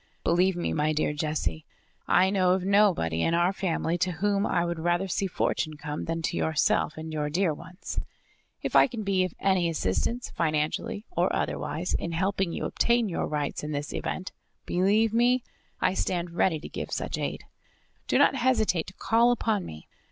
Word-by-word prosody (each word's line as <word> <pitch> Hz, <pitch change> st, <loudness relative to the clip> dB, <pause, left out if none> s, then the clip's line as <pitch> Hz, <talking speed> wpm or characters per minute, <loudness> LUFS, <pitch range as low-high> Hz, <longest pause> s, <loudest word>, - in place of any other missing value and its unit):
"Believe 180 Hz, +2 st, +3 dB
me, 175 Hz, -, -2 dB
my 155 Hz, +1 st, +1 dB
dear 155 Hz, 0 st, 0 dB
Jessie, 150 Hz, -, -2 dB, 0.4 s
I 190 Hz, +1 st, +4 dB
know 185 Hz, -2 st, +3 dB
of 185 Hz, -1 st, -1 dB
nobody 190 Hz, -, +3 dB
in 165 Hz, -, +2 dB
our 175 Hz, +3 st, +2 dB
family 175 Hz, -2 st, -1 dB
to 180 Hz, +2 st, +1 dB
whom 200 Hz, +4 st, +1 dB
I 170 Hz, -1 st, +1 dB
would 170 Hz, -1 st, -3 dB
rather 175 Hz, +3 st, +1 dB
see 195 Hz, +2 st, -1 dB
fortune 155 Hz, -3 st, -1 dB
come 150 Hz, 0 st, -5 dB
than 165 Hz, 0 st, -3 dB
to -, -, -1 dB
yourself 155 Hz, -1 st, +1 dB
and 160 Hz, 0 st, -6 dB
your 150 Hz, -1 st, -1 dB
dear 170 Hz, +1 st, +1 dB
ones. 170 Hz, +5 st, -7 dB, 0.6 s
If -, -, -3 dB
I -, -, +7 dB
can 230 Hz, -4 st, -5 dB
be 195 Hz, -2 st, +2 dB
of 185 Hz, -, -7 dB
any 190 Hz, -3 st, +2 dB
assistance, 165 Hz, -, -1 dB
financially, 165 Hz, +8 st, -1 dB
or -, -, +1 dB
otherwise, -, -, -2 dB
in 170 Hz, -, -2 dB
helping 190 Hz, +1 st, 0 dB
you -, -, -3 dB
obtain 235 Hz, -2 st, +2 dB
your 170 Hz, -, -2 dB
rights 150 Hz, -1 st, -2 dB
in 150 Hz, 0 st, -4 dB
this 145 Hz, 0 st, -4 dB
event, 185 Hz, -, -4 dB, 0.3 s
believe 205 Hz, +5 st, +2 dB
me, 245 Hz, +2 st, +3 dB, 0.4 s
I -, -, +3 dB
stand 175 Hz, -2 st, -1 dB
ready 170 Hz, -1 st, +1 dB
to -, -, -7 dB
give -, -, -6 dB
such -, -, -3 dB
aid. -, -, -3 dB, 0.6 s
Do -, -, +2 dB
not -, -, +5 dB
hesitate 235 Hz, -10 st, +1 dB
to 185 Hz, -, -11 dB
call 235 Hz, +1 st, +3 dB
upon 220 Hz, -5 st, 0 dB
me. 80 Hz, 0 st, -10 dB
175 Hz, 185 wpm, -27 LUFS, 155-200 Hz, 0.6 s, I